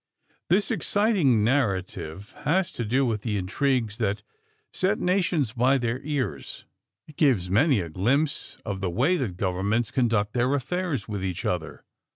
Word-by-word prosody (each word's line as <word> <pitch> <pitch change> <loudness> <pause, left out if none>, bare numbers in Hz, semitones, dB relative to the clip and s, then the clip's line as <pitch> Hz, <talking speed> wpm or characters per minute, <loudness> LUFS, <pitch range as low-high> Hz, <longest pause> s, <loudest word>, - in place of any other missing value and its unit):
This 195 +4 +2
exciting 190 - +2
narrative 100 - -1
has 180 +5 +1
to 120 - -4
do 130 +5 +1
with 110 -4 -1
the 105 -2 -2
intrigues 115 +3 0
that 105 -2 -1 0.5
set 195 +3 +1
nations 180 - +1
by 130 +3 +3
the 120 0 -1
ears. 135 - -4 0.4
It 155 - -15
gives 115 - +2
many 125 - +4
a 85 - -5
glimpse 135 - 0
of 95 -2 -4
the 95 - 0
way 160 - +2
that 105 - -3
governments 100 +5 0
conduct 115 -4 +1
their 125 +3 +2
affairs 170 +2 -2
with 100 -3 -4
each 90 -2 -3
other. 85 -3 -3
120 Hz, 155 wpm, -26 LUFS, 100-145 Hz, 0.5 s, many